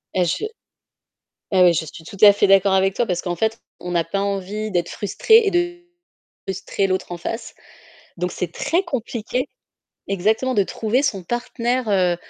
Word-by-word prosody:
Heu, 185 - +3
je 170 - -1
heu, - - -1 1.2
ouais, 175 - +7
je 165 -1 -1
suis 160 +1 -11
tout 200 - -10
à 205 -1 +10
fait 205 0 +2
d'accord 195 0 +5
avec 190 0 +3
toi 240 - 0
parce 180 -2 -1
qu'en 175 -2 -3
fait, 220 +2 0 0.2
on 180 0 -5
n'a 170 -1 +1
pas 195 +4 -2
envie 200 +2 -3
d'être 175 -2 0
frustré 440 - +3
et - - +3
de 350 -1 0 0.7
frustrer 195 +1 -1
l'autre 185 -2 -2
en - - -3
face, 225 +6 -5 0.6
donc 180 0 -2
c'est 175 -2 -4
très 345 - 0
compliqué 250 -3 -3 0.6
exactement, 220 +7 +1
de 200 - +4
trouver 225 +7 0
son 195 -10 -1
partenaire, 240 +1 -2
heu, 180 -3 +2
200 Hz, 180 wpm, -21 LUFS, 180-235 Hz, 1.2 s, à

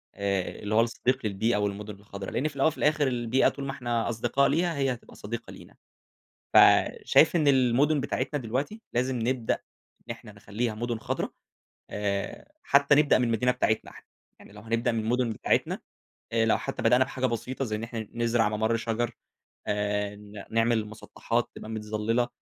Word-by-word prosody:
آآ 100 -3 -2
اللي 105 +1 -2
هو 115 - +6
الصديق 120 +2 0
للبيئة، 105 +2 +1
والمُدُن 105 +1 -3
الخضرا، 100 -1 -8
لإن 150 - 0
في 150 - -7
الأول، 140 +2 +3
وفي 160 - -1
الآخر 150 -1 +2
البيئة 120 0 +2
طول 140 - -7
ما 135 - -2
إحنا 120 -3 -2
أصدقاء 120 +4 +1
ليها، 170 +3 +1
هي 135 -2 +1
هتبقى 120 - -13
صديقة 110 +2 -6
لينا. - - -14 0.8
فشايف - - +5
إن 155 -3 +3
المُدُن 135 +3 +3
بتاعتنا 145 +1 -2
دلوقتي 130 - -3
لازم 125 +1 0
نبدأ 120 0 0 0.5
إن - - -8
إحنا 115 -2 -8
نخلّيها 105 +3 -3
مُدُن 120 +1 -3
خضرا، - - -2 0.6
آآ 100 - -3
حتّى 140 +1 +4
نبدأ 145 0 +5
من 125 - +2
المدينة 120 +2 +2
بتاعتنا 110 -3 0
إحنا. - - -15 0.3
يعني - - -16
لو 105 - -11
هنبدأ 115 +2 0
من 115 - 0
المُدُن 120 +1 0
بتاعتنا، - - 0 0.5
آآ 115 0 +2
لو 115 - +3
حتّى - - -5
بدأنا 125 +1 +5
بحاجة 130 0 -3
بسيطة، 125 +3 -2
زي 110 -3 -2
إن 105 - -5
إحنا 115 -2 -5
نزرع 115 -2 +2
مَمَر 110 +2 0
شَجَر، 115 +1 -1 0.6
آآ 105 0 -1
ن 105 -1 -11
نعمل 115 +1 +3
المُسطّحات 110 +2 -3
تبقى - - -9
متظلّلة، 110 +2 -1
115 Hz, 175 wpm, -27 LUFS, 110-130 Hz, 0.8 s, هو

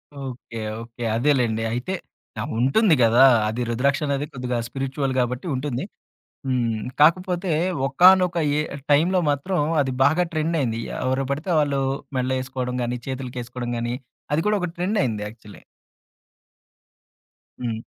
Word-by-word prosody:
Okay. 130 -4 -7 0.2
Okay. 115 +1 -9
అదేలెండి. 120 -3 +2
అయితే. 125 +10 -3 0.5
ఆ! - - -1 0.2
ఉంటుంది 160 - +4
గదా! 115 +3 +6 0.2
అది 115 +3 -2
రుద్రాక్షనేది 140 +3 0
కొద్దిగా 125 -1 -2
స్పిరిట్యువల్ 135 +1 -2
గాబట్టి 125 +6 -1
ఉంటుంది. 130 -1 -3 0.6
హ్మ్. 120 -4 0 0.2
కాకపోతే, 180 +3 +3 0.4
ఒకానొక 180 +4 +5 0.2
ఏ - - +2 0.3
టైంలో 175 +6 +4
మాత్రం 145 +6 0 0.2
అది 130 -2 -1
బాగా 160 +6 +3
ట్రెండయింది. 155 -8 0 0.2
ఎవరు 130 +1 0
బడితే 155 +6 -2
వాళ్ళు 140 -2 +1 0.4
మెళ్ళో 130 +1 0
ఏసుకోడం 130 -1 -4
గాని, 120 +1 -2
చేతులకెసుకోడం 125 -2 -5
గాని, 120 +1 -2 0.4
అది 160 - +2
కూడా 210 -1 +3
ఒక 180 - -1
ట్రెండయ్యింది 175 - 0
యాక్చువల్లీ. 105 -1 -13 2.0
హ్మ్. 115 -2 -3
135 Hz, 120 wpm, -23 LUFS, 120-155 Hz, 2.0 s, గదా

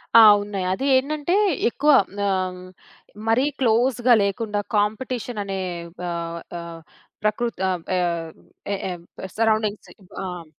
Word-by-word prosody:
ఆ! - - +11 0.2
ఉన్నాయి. 200 -3 -4
అదీ 265 - -3
ఏంటంటే, 295 +5 -1 0.4
ఎక్కువ 295 +5 +2 0.4
ఆహ్, 185 -2 -1 0.7
మరీ 225 +3 +3 0.2
క్లోజ్‌గా 245 +1 +3
లేకుండా, 205 +1 -2 0.2
కాంపిటీషననే 210 -1 -1 0.5
ఆహ్, 170 0 -4 0.2
ఆహ్ 170 -1 -8 0.4
ప్రకృత్ 215 +1 -1
అబ్ 180 -3 -3
ఆహ్, 170 -2 -1 0.4
ఎ - - +1 0.2
ఎబ్ 175 -1 -8 0.3
సరౌండింగ్స్ 215 -2 +1
ఇబ్ 185 -2 -20
ఆహ్, 180 -3 -6
205 Hz, 115 wpm, -23 LUFS, 180-235 Hz, 0.7 s, ఆ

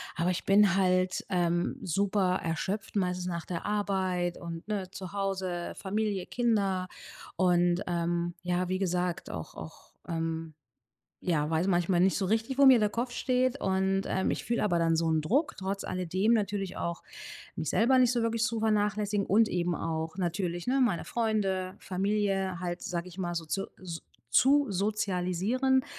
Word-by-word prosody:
aber 175 +2 +1
ich 180 - -3
bin 195 -2 +5
halt, 185 -1 +2
ähm, 175 -2 0
super 190 +1 +1
erschöpft, 190 +6 -3
meistens 180 -2 0
nach 170 -2 -3
der 170 -2 -5
Arbeit 190 -4 0
und, 170 0 -7
ne, 200 -4 -2
zu 190 -1 -8
Hause, 190 -3 -2
Familie, 205 -1 -2
Kinder 200 -6 0 0.5
und, 175 -1 +3
ähm, 175 0 -1
ja, 180 0 0
wie 185 0 0
gesagt, 180 -1 -1
auch 80 -2 -7
auch, 80 0 -10 0.2
ähm 165 -1 -3 0.7
ja, 150 -4 +1
weiß 165 +3 +1
manchmal 175 -1 +2
nicht 190 +1 +3
so 195 - 0
richtig, 225 +6 0
wo 280 - +6
mir 260 -3 +8
der 210 -1 +2
Kopf 240 +3 -2
steht. 255 +2 0
Und, 190 0 +1
ähm, 190 - 0
ich - - -2
fühle 235 0 -1
aber 185 -5 +2
dann 165 -1 +2
so 165 0 +1
'n 160 -1 +2
Druck 270 - +1
trotz 195 +1 -3
alledem 185 +5 +1
natürlich 200 -3 -1
auch 170 -1 -3 0.5
mich 160 -3 -2
selber 250 +4 +4
nicht 250 -1 +5
so 240 -1 0
wirklich 230 0 0
zu 230 0 0
vernachlässigen. 210 -1 +1
Und 220 +3 +4
eben 175 -2 0
auch 160 +1 -3
natürlich, 175 0 -2
ne, 265 +2 +2
meine 235 -9 +1
Freunde, 195 -5 -1
Familie 195 -1 -1
halt, 175 0 -4
sage 175 0 -3
ich 180 0 -12
mal 175 -2 -2
so 165 -1 -3
zu 195 +5 -2
su 170 -3 -6 0.3
zu 285 +2 +5
sozialisieren. 205 +6 +1
190 Hz, 170 wpm, -29 LUFS, 175-210 Hz, 0.7 s, mir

